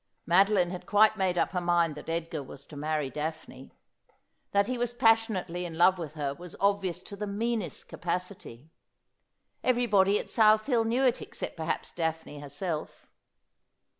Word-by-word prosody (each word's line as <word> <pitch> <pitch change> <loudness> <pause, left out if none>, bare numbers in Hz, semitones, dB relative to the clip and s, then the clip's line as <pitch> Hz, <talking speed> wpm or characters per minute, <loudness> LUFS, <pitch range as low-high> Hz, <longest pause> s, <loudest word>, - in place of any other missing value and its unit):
Madoline 185 0 +4
had 180 - -7
quite 215 +1 +5
made 190 -3 0
up - - +1
her 180 - -1
mind 175 -2 +2
that 150 +2 -9
Edgar 165 -2 -2
was 135 0 -11
to 150 - -13
marry 150 -1 -2
Daphne. 150 -3 -6 0.8
That 200 0 +3
he 255 - -2
was 240 0 -2
pas 225 -1 +4
sionately 180 -4 -3
in 165 -2 -6
love 185 +2 +5
with 155 -3 -6
her 145 -3 -2
was 175 +3 -11
obvious 200 -3 +1
to 200 - -10
the 210 +1 -4
meanest 220 0 -3
capacity. 175 - -5 0.9
Everybody 210 -6 +3
at - - -5
South 215 -1 +4
Hill 240 -5 +2
knew 240 +4 +1
it 250 - +2
except - - -6
perhaps 160 -1 -3
Daphne 160 -3 -3
her 145 -1 -9
self. 155 +2 -5
180 Hz, 165 wpm, -29 LUFS, 160-210 Hz, 0.9 s, quite